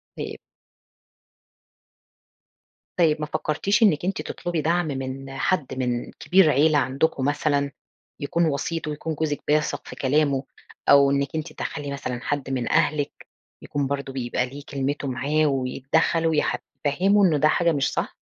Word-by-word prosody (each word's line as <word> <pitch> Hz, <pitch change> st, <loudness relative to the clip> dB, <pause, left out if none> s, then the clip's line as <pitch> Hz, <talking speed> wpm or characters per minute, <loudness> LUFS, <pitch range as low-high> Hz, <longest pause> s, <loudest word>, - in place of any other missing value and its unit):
طيب. -, -, -5 dB, 2.6 s
طيب 160 Hz, -3 st, +3 dB
ما -, -, 0 dB
فكرتيش 155 Hz, +8 st, 0 dB
إنِّك 175 Hz, -6 st, +3 dB
أنتِ 190 Hz, +1 st, -1 dB
تطلبي 175 Hz, -2 st, -3 dB
دعم 170 Hz, +2 st, +1 dB
من 135 Hz, -1 st, -5 dB
حد 150 Hz, -3 st, 0 dB
من 125 Hz, -1 st, -2 dB
كبير 185 Hz, -3 st, +3 dB
عيلة 150 Hz, +2 st, +4 dB
عندكم 135 Hz, +1 st, 0 dB
مثلًا، 145 Hz, 0 st, +1 dB, 0.5 s
يكون 165 Hz, +4 st, +1 dB
وسيط 160 Hz, +2 st, -2 dB
ويكون 155 Hz, +1 st, -3 dB
جوزِك 150 Hz, -1 st, -2 dB
بيثق 150 Hz, +1 st, 0 dB
في -, -, -8 dB
كلامه؟ 140 Hz, 0 st, +1 dB, 0.5 s
أو 140 Hz, -1 st, +7 dB
إنِّك 140 Hz, 0 st, +1 dB
أنتِ 155 Hz, -1 st, -4 dB
تدخّلي 145 Hz, -1 st, -5 dB
مثلًا 125 Hz, -3 st, -4 dB
حد 145 Hz, -2 st, -2 dB
من 130 Hz, -3 st, -2 dB
أهلِك، 145 Hz, -1 st, 0 dB, 0.3 s
يكون 145 Hz, -1 st, -2 dB
برضه 140 Hz, -1 st, -3 dB
بيبقى 125 Hz, -1 st, -1 dB
ليه 140 Hz, +2 st, -9 dB
كلمته 140 Hz, +1 st, -2 dB
معاه، 140 Hz, +5 st, +1 dB
ويتدخَّل 135 Hz, +5 st, +1 dB
ويح 155 Hz, -2 st, +1 dB, 0.3 s
يفهِّمُه 195 Hz, +8 st, +4 dB
إن 155 Hz, -5 st, +3 dB
ده 155 Hz, -, +5 dB
حاجة 170 Hz, +2 st, +3 dB
مش 140 Hz, -4 st, 0 dB
صح؟ -, -, -3 dB
145 Hz, 145 wpm, -24 LUFS, 135-160 Hz, 2.6 s, أو